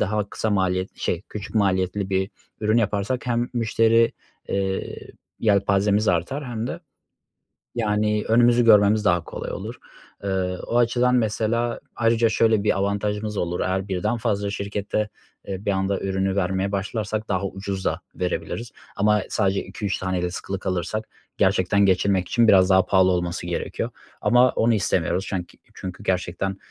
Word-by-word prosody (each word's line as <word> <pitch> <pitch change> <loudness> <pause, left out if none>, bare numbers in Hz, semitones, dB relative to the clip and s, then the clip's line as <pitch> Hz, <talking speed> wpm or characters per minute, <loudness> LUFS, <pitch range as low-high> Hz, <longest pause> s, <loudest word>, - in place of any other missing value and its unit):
daha 105 0 0
kısa 110 - -2
maliyetli 95 -1 0
şey, 85 +2 -1
küçük 105 +1 -7
maliyetli 95 -1 +1
bir 95 +2 0 0.3
ürün 110 +1 +2
yaparsak 105 +4 -1
hem 120 0 0
müşteri, 115 0 +3 0.4
eee, 95 -1 -2 0.4
yelpazemiz 100 0 +2
artar 135 - 0
hem 120 -2 -4
de, 170 +6 -5 1.0
yani, 105 -2 +1
önümüzü 120 +1 +4
görmemiz 105 -1 +5
daha 85 -2 +3
kolay - - -6
olur. - - -6 0.5
Iıı, 95 -2 -1
o 120 - +1
açıdan 120 +1 +3
mesela 115 +1 0 0.2
ayrıca 115 0 +3
şöyle 110 -1 +3
bir 105 - +2
avantajımız 105 +1 -1
olur 85 0 -1
eğer 95 +1 -1
birden 105 +5 -1
fazla 105 -3 -1
şirkete, 100 +1 -2 0.4
eee, 95 0 -5
bir 100 - +2
anda 95 0 0
ürünü 95 0 -1
vermeye 95 +1 0
başlarsak 110 +2 -2
daha 95 0 0
ucuz 95 0 -5
da - - -1
verebiliriz 110 +5 -3 0.2
ama 105 0 +3
sadece 100 -2 +1
2-3 100 -2 -3
tane 95 -1 -2
de 90 - -1
sıkılı 95 +1 -4
kalırsak 95 +4 -3 0.3
gerçekten 100 +2 +3
geçinmek 95 -1 +2
için 120 -2 +3
biraz 95 -2 +6
daha 95 -1 +5
pahalı 95 -1 +4
olması 85 -1 -2
gerekiyor 85 - -3 0.3
ama 125 +1 +5
onu 115 +1 +2
istemiyoruz. 95 -2 0
Çenk 90 -3 -4 0.2
çünkü 90 -1 -7
gerçekten, 95 +1 -1
100 Hz, 150 wpm, -23 LUFS, 95-110 Hz, 1.0 s, biraz